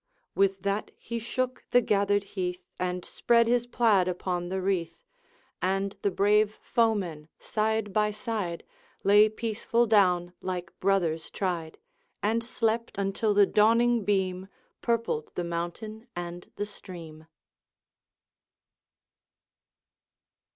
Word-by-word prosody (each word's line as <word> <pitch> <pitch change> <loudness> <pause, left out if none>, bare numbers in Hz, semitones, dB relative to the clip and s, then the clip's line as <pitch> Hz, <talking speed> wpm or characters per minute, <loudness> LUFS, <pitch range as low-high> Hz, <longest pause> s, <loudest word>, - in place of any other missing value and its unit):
With 195 -1 +1
that 200 +1 -1
he 235 0 -5
shook 255 +2 -3
the 245 - +6
gathered 205 -3 +2
heath, 180 -2 -3
And 180 0 -2
spread 235 -1 +3
his 240 0 +2
plaid 215 -7 +3
upon 180 -1 -2
the 190 +1 -1
wreath; 175 -4 -2 0.6
And 195 +2 0
the 200 - +2
brave 210 +2 +3
foemen, 200 -10 0
side 220 -1 -1
by 210 0 +3
side, 210 -5 -3 0.4
Lay 205 +2 +6
peaceful 230 +2 0
down 180 -5 +3
like 180 -1 -4
brothers 175 -5 +1
tried, 175 -5 -3 0.5
And 225 +3 +1
slept 230 -2 -1
until 200 +2 0
the 205 0 +7
dawning 230 +3 +4
beam 190 -2 0 0.3
Purpled 230 -10 -1
the 175 - -1
mountain 175 +7 -5
and 175 0 -6
the 205 - -2
stream. 165 -6 -11
200 Hz, 115 wpm, -28 LUFS, 180-220 Hz, 0.6 s, the